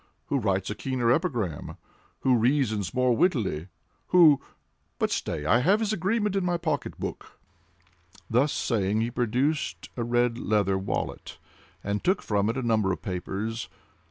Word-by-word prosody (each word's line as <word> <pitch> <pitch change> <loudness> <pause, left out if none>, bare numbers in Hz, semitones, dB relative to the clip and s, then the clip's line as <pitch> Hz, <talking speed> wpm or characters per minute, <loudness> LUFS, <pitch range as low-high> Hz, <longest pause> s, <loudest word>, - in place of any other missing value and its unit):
Who - - +1
writes 95 0 0
a - - -1
keener 125 0 0
epigram? 120 - -1 0.4
Who 130 -1 +4
reasons 115 -5 +1
more 125 -1 +2
wittily? 110 - +1 0.4
Who—but 155 -6 +2
stay! 75 - -2
I 115 +9 +4
have 190 +11 +3
his 215 -1 0
agreement 210 +2 0
in 195 - +1
my 175 -1 +1
pocket 155 -5 -3
book." - - -7 0.9
Thus 130 +6 +2
saying, 105 -2 0
he 115 +1 -1
produced 125 +6 -1
a 120 - -2
red 120 0 +1
leather 100 -4 +1
wallet, 95 - -4 0.5
and 100 0 -2
took 185 +2 +1
from 105 0 +1
it 115 - -2
a 130 - -2
number 110 -4 +2
of 95 - -4
papers. 100 +5 -4
120 Hz, 150 wpm, -27 LUFS, 105-150 Hz, 0.9 s, Who